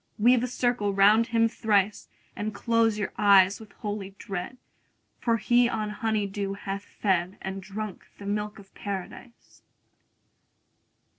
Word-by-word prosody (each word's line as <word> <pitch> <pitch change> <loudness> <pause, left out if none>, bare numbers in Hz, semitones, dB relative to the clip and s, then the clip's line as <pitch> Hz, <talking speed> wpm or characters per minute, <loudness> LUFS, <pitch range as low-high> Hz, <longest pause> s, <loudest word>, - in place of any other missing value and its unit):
50 210 - -5
Weave 245 0 +5
a - - 0
circle 245 -4 0
round 210 +4 +5
him 230 -1 +3
thrice, 210 -3 0 0.3
And 210 0 -4
close 230 0 +2
your 205 - -3
eyes 200 -1 +6
with 220 -2 -13
holy 205 -2 -5
dread, 195 +6 -5 0.6
For 230 -1 +1
he 240 +2 +3
on 215 -3 -2
honey 215 -1 -1
dew 195 0 -3
hath 200 0 -5
fed, 190 -3 -1
And 190 0 -5
drunk 205 +1 -7
the 200 - -10
milk 210 +1 -2
of 195 -2 -15
Paradise. 200 +4 -8
210 Hz, 145 wpm, -27 LUFS, 195-225 Hz, 0.6 s, eyes